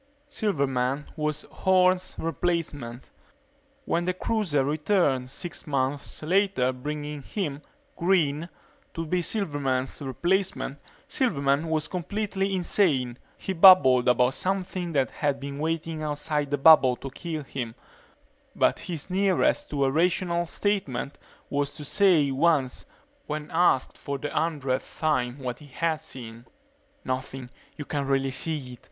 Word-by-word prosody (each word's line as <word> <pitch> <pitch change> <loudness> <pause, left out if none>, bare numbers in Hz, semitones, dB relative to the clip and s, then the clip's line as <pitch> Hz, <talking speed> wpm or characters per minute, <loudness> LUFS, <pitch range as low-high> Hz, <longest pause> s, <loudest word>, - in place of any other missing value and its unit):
Silverman 140 - -1
was 150 -1 -1
Horne's 185 0 +2
replacement. 155 -7 -3 0.7
When 170 +1 0
the 180 0 0
cruiser 185 -10 0
returned 150 -4 +1
six 170 +6 -7
months 140 +1 -2
later 180 -6 +2
bringing 150 +2 -5
him, 150 -3 -4 0.3
Green, 170 -3 +1 0.5
to 165 - -3
be 180 +3 0
Silverman's 145 - -1
replacement, 170 +1 -1 0.3
Silverman 145 - +1
was 155 -1 0
completely 195 +1 -2
insane. 145 - +1 0.2
He 190 - -3
babbled 165 -9 +7
about 125 +1 +4
something 185 -1 -2
that 135 -5 +1
had 145 -2 -1
been 140 +1 -6
waiting 160 0 -2
outside 150 -1 -2
the 145 - 0
bubble 135 -3 +7
to 135 +2 -8
kill 160 +1 -5
him 125 -4 -5 0.8
but - - +2
his 165 -5 -6
nearest 200 +11 +2
to 140 -1 +1
a 135 - +2
rational 170 +2 +1
statement 160 -10 -2 0.3
was 145 0 -1
to 150 - -8
say 170 -6 +4
once, 135 -2 +1 0.4
when 150 0 -4
asked 165 -6 +2
for 140 0 -4
the 145 +2 -5
hundredth 145 -5 -2
time 130 -5 +1
what 125 -3 -5
he 150 - -13
had 160 +4 -1
seen: 120 -1 -10 0.6
"Nothing 130 -1 -4 0.3
you 150 - -6
can't 140 -2 -2
really 135 0 +1
see 135 -2 -4
it. 120 - -12
150 Hz, 130 wpm, -26 LUFS, 135-175 Hz, 0.8 s, babbled